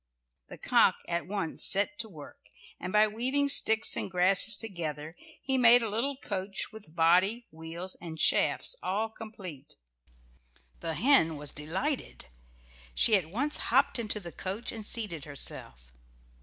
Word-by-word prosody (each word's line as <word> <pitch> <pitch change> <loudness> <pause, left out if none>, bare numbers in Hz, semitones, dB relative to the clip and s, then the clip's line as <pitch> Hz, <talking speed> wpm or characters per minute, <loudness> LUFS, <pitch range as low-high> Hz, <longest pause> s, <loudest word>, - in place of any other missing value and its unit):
The - - -11
cock - - +3
at 170 0 -3
once 195 -5 -2
set 205 +10 +4
to 225 - -4
work, 150 - -14 0.3
and 185 - -5
by 215 +1 +4
weaving 260 +6 0
sticks 220 -5 +3
and - - -3
grasses 190 +3 +3
together 160 -7 -6 0.3
he 265 -1 0
made 240 0 +6
a 225 - -2
little 260 +6 -2
coach 195 -5 -4
with 205 -8 -14
body, 185 +8 +2
wheels, 165 +3 -7
and 160 -2 -8
shafts - - +3
all 215 +4 -2
complete. 190 -11 -10 1.0
The 165 -1 -4
hen 165 - +3
was 145 -1 -5
delighted. 190 - -4 0.7
She 220 - +4
at 175 -5 -1
once 280 - 0
hopped 260 +1 +3
into 215 -2 -2
the 175 -4 -9
coach, 195 +8 -4
and 220 -2 -7
seated 195 - -2
herself. - - -6
195 Hz, 145 wpm, -29 LUFS, 165-225 Hz, 1.0 s, made